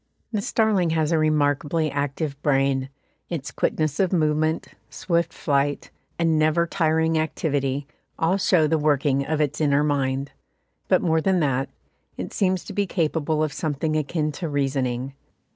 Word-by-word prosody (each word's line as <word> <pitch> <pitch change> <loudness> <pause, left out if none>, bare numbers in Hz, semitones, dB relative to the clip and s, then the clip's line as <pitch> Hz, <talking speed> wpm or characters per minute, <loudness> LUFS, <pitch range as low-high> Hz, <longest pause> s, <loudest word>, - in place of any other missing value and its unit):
The 215 -3 -1
starling 210 -5 +2
has 155 0 +1
a 165 - +3
remarkably 155 0 +1
active 145 0 -3
brain; 135 -2 +1 0.4
its 155 -5 -4
quickness 155 -2 -1
of 190 -2 +2
movement, 155 -2 +1 0.2
swift 170 -2 -1
flight, 145 -1 -1 0.3
and 165 -2 +2
never 155 +2 +3
tiring 160 -1 +1
activity, 145 -3 -1 0.3
all 170 +4 +2
show 180 -4 +3
the 160 +1 +1
working 140 -2 +2
of 155 -1 0
its 150 0 0
inner 145 -1 +3
mind; 140 -2 -1 0.6
but - - +3
more 160 -2 +2
than 190 +1 +2
that, 135 -2 0 0.5
it - - -5
seems 185 -2 +1
to - - -8
be 200 0 0
capable 155 -3 0
of 155 -3 -2
something 155 0 -2
akin 155 0 -1
to 165 +2 -5
reasoning. 135 -2 -1
155 Hz, 150 wpm, -24 LUFS, 140-165 Hz, 0.6 s, a